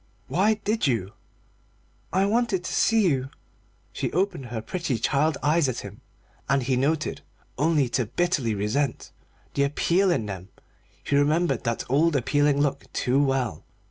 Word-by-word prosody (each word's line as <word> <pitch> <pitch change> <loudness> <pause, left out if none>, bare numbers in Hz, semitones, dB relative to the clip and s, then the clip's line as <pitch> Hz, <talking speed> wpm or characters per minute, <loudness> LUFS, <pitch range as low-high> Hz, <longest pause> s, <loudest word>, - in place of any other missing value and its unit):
"Why 210 +5 +2
did 215 -2 -1
you?" 105 -6 -1 1.0
"I 190 +2 +2
wanted 210 -3 +1
to - - -4
see 225 -3 +3
you." 135 -4 0 0.6
She - - -2
opened 180 -7 -1
her 120 -1 -4
pretty 145 +2 -2
child 145 +6 +1
eyes 150 -1 +3
at 125 - -3
him, - - -10 0.5
and 135 -1 +2
he 130 +1 +1
noted, 150 +4 0 0.3
only 150 -2 +2
to 120 -2 0
bitterly 135 -4 0
resent, 120 +7 -1 0.4
the 140 - 0
appeal 170 +7 +2
in 140 -11 +1
them. 95 -2 -7 0.5
He 140 - 0
remembered 145 -2 +2
that 115 0 -1
old 150 +5 +2
appealing 145 +2 +2
look 140 -1 -2
too 135 +3 +2
well. 130 - -1
145 Hz, 150 wpm, -25 LUFS, 125-170 Hz, 1.0 s, see